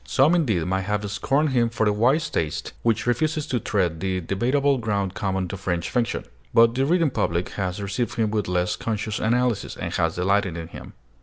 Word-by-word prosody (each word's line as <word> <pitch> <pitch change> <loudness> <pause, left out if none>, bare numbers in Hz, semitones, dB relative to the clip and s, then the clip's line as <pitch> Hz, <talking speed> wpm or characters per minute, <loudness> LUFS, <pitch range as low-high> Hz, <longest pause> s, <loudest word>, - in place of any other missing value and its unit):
Some, 140 +5 +3
indeed, 115 - +1
may 95 +1 0
have 105 +2 -2
scorned 140 +8 +1
him 120 -3 +2
for 110 -1 0
the 105 - +3
wise 125 +9 +2
taste 80 -2 -3
which 115 -2 +1
refuses 150 +6 0
to 130 -5 -1
tread 90 -8 0
the 95 +1 -1
debatable 130 - +1
ground 100 -5 -1
common 95 -2 -1
to 100 - -5
French 90 -3 -2
fiction. 120 -2 0 0.3
But 115 0 +6
the 135 +2 +1
reading 165 -3 +3
public 85 -6 -1
has 95 -1 -3
received 100 +3 -2
him 110 -2 0
with 105 -2 -1
less 90 0 0
conscious 110 -1 -3
analysis, 120 0 0
and - - -4
has 85 -1 0
delighted 95 -1 +1
in 80 0 -6
him. - - -10
105 Hz, 200 wpm, -24 LUFS, 95-125 Hz, 0.3 s, But